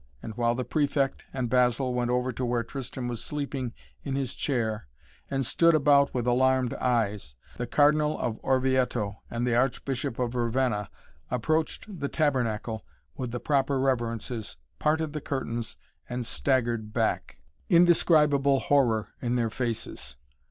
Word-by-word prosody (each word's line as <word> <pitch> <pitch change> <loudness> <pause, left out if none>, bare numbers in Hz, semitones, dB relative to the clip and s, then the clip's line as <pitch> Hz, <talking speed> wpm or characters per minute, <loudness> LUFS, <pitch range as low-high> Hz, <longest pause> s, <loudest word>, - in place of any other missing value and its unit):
And 110 - -6
while 120 +1 +1
the 125 - -2
Prefect 140 +1 0
and 130 -2 -2
Basil 125 +1 +2
went 120 -1 0
over 125 +1 +1
to 125 +2 -4
where 120 -1 0
Tristan 130 +1 -5
was 120 -2 -3
sleeping 140 -4 -3 0.3
in 135 - -3
his 135 -2 -2
chair, 110 - -1 0.4
and 135 -1 -1
stood 165 +7 +4
about 140 -1 +4
with 125 -2 -2
alarmed 130 0 +3
eyes, 105 - -1 0.2
the 120 - -3
Cardinal 150 +1 +3
of 115 -2 -2
Orvieto 130 -6 +1
and 120 +1 -2
the 125 - +1
Archbishop 130 +1 0
of 125 -1 -1
Ravenna 120 -3 0 0.4
approached 155 - -1
the 140 - -1
tabernacle 115 - 0 0.3
with 125 - -4
the 120 +1 -4
proper 140 -1 +1
reverences, 120 - -2 0.2
parted 155 0 +1
the 150 - -4
curtains 120 -5 -3 0.3
and 125 0 -3
staggered 120 -4 0
back, - - -1 0.3
indescribable 150 -5 +5
horror 120 -8 +2
in 120 0 0
their 115 -2 0
faces. 115 - -4
125 Hz, 145 wpm, -27 LUFS, 120-140 Hz, 0.4 s, indescribable